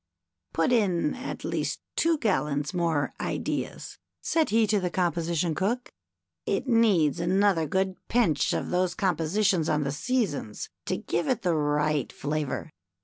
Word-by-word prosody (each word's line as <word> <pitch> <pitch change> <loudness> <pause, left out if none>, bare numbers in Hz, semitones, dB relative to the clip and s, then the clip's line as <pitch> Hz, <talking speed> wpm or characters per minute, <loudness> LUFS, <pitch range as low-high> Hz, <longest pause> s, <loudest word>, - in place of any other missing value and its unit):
" 80 0 -52
Put 165 +8 +2
in 185 -10 +2
at 260 +2 -6
least - - -2 0.2
two 330 -1 +2
gallons 150 - 0
more 165 -5 0
Ideas," - - -3 0.2
said 325 -2 +1
he 225 +1 +4
to 210 0 +2
the 180 -1 -1
Composition 170 -2 0
cook. 220 +9 -2 0.3
" 85 -2 -60
It 260 - -6
needs 205 - +3
another 180 -1 +2
good 190 +3 0
pinch 215 - +2
of - - -2
those 180 0 +1
compositions 180 0 +1
on 150 -1 +1
the 140 - -1
Seasons 245 - -2 0.2
to - - 0
give - - -2
it 255 - 0
the 175 -2 +2
right 150 -2 +1
flavor. 150 +1 -3
175 Hz, 150 wpm, -27 LUFS, 150-210 Hz, 0.3 s, he